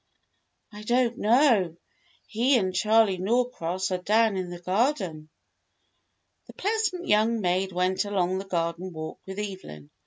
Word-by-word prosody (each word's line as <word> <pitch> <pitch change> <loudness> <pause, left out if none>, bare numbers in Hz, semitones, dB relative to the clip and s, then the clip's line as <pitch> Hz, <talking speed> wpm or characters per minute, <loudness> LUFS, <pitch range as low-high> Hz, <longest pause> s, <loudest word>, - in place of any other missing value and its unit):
" - - -50
"I 210 - -9
don't 240 +2 +1
know. 215 - +3 0.5
He 245 +5 +2
and 190 -4 -1
Charley 210 0 +3
Norcross 190 -4 -1
are 185 - -1
down 215 +3 +2
in 185 -1 -3
the 175 - -7
garden." 185 - -1 1.2
The - - -12
pleasant 395 -4 -2
young 220 +2 +3
maid 185 0 0
went 185 +2 0
along 190 -2 0
the 195 - -7
garden 170 0 -3
walk 155 0 -7
with 190 0 -7
Evelyn. 185 - -7
195 Hz, 145 wpm, -26 LUFS, 180-230 Hz, 1.2 s, know